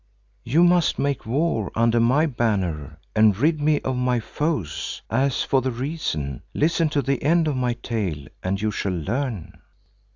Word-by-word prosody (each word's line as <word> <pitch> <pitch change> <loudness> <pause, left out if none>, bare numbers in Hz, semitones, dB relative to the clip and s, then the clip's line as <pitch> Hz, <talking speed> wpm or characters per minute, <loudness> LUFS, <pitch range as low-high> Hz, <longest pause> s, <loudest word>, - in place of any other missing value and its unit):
"You 155 +9 +3
must 175 -2 +3
make 140 -4 -1
war 125 - 0
under 115 +1 +3
my 130 +7 +3
banner 100 - -1 0.2
and 110 -2 +5
rid 155 +5 +2
me 150 0 +3
of 130 - -2
my 125 -1 +1
foes. 115 - -3
As 130 +2 +1
for 135 - +2
the 130 - -1
reason, 120 - -3
listen 165 +1 +2
to 145 -2 0
the 135 +1 -1
end 165 +2 +3
of 150 - 0
my 125 -1 0
tale 95 - -3 0.2
and 95 +1 -1
you 110 +1 0
shall 100 -2 -2
learn." 115 - -3
125 Hz, 165 wpm, -23 LUFS, 110-145 Hz, 0.2 s, and